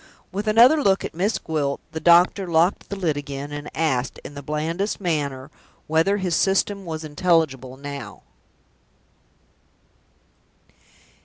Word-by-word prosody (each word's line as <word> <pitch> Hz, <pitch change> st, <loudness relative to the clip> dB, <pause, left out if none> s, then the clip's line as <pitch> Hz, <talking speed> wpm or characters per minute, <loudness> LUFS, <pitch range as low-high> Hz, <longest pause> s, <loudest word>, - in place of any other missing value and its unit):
With 205 Hz, +3 st, -4 dB
another 240 Hz, +8 st, +6 dB
look 195 Hz, -6 st, +2 dB
at -, -, -6 dB
Miss 195 Hz, +7 st, 0 dB
Gwilt, 145 Hz, -3 st, -2 dB
the 160 Hz, -, -4 dB
doctor 175 Hz, +3 st, +4 dB
locked 170 Hz, +3 st, +1 dB
the 200 Hz, -, -4 dB
lid 170 Hz, -7 st, -1 dB
again, 145 Hz, 0 st, -6 dB
and 145 Hz, 0 st, -6 dB
asked, 135 Hz, -6 st, -1 dB
in -, -, -9 dB
the 140 Hz, -, -8 dB
blandest 160 Hz, +8 st, -2 dB
manner, 145 Hz, -6 st, -2 dB, 0.3 s
whether 165 Hz, +6 st, +2 dB
his 185 Hz, -4 st, -1 dB
System 195 Hz, +1 st, +1 dB
was 160 Hz, -1 st, -5 dB
intelligible 145 Hz, -5 st, 0 dB
now? 140 Hz, 0 st, -8 dB
160 Hz, 130 wpm, -23 LUFS, 145-190 Hz, 0.3 s, another